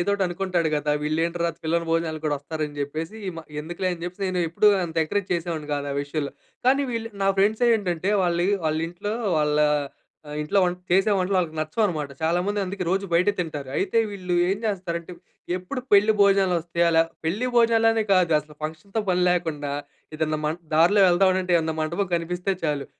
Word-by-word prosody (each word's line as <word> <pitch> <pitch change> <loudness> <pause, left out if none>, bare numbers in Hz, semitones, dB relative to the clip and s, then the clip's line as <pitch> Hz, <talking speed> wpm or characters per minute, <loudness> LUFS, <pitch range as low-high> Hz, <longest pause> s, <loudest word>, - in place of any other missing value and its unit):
ఏదో 175 - 0
ఒకటి 200 -1 +1
అనుకుంటాడు 175 -2 -1
గదా! 150 0 0
వీళ్ళేంట్రా 170 +2 0
పిలవని 170 +1 0
భోజనాలకు 160 -1 -1
గూడా 145 -1 +1
వస్తారని 150 0 -4
జెప్పేసి 155 +8 -4 0.5
ఎందుకులే 175 +4 -3
అని 170 -1 -7
చెప్పేసి, 185 +2 -4
నేను 175 -2 +1
ఎప్పుడూ 210 +5 +4 0.2
అంత 165 0 -10
ఎంకరేజ్ 195 +4 -2
చేసేవాడిని 165 -3 -4
కాదు 145 0 -3
ఆ - - -4
విషయంలో. 145 0 -4 0.3
కానీ 275 +2 +4
వీళ్ళు 230 -1 -3 0.2
నా - - +3
ఫ్రెండ్స్ 215 +4 +2
ఏంటంటే 185 -3 -1
వాళ్ళు 175 -1 +1 0.2
వాళ్ళింట్లో 165 +6 -2 0.3
వాళ్ళ 150 -1 +1 0.7
ఆహ్, 150 - -6
ఇంట్లో 150 +7 0
వం 180 -1 +2 0.2
చేసే 195 +4 +4
వంటలు 190 +1 0
వాళ్ళకి 165 -3 -2
నచ్చవనమాట. 155 -1 -1
చాలామంది 180 +6 0
అందుకే 190 0 -4
రోజు 195 +2 0
బయట 175 +4 +3
తింటారు. 150 -6 -4
అయితే 200 +4 +1
వీళ్ళు 185 -3 -3
ఏం 195 - +1
జేస్తారంటే 180 -5 -3 0.4
ఎప్పుడు 185 +9 -5
పెళ్లి 205 +2 +6
భోజనాలు 195 -2 +4
వస్తాయా? 170 +1 +1
లా 165 - +7 0.2
పెళ్లి 200 +10 0
భోజనాలు 230 -1 +4
అనే 225 0 +1
కాదు 180 -4 +4
అసలు 150 0 -17
ఫంక్షన్‌తో 160 +8 -4
పని 180 0 +2
లాకుండా 160 -5 -1 0.4
ఏదైనా 155 0 -1
మన్ 155 +3 -2 0.2
దారిలో 175 +6 +5
వెళ్తాఉంటే 185 0 +3
ఏమన్నా 160 -1 -2
మంటపం 170 +5 -1
కనిపిస్తే 180 +3 -1
చాలు 145 -3 -1
175 Hz, 170 wpm, -24 LUFS, 160-195 Hz, 0.7 s, లా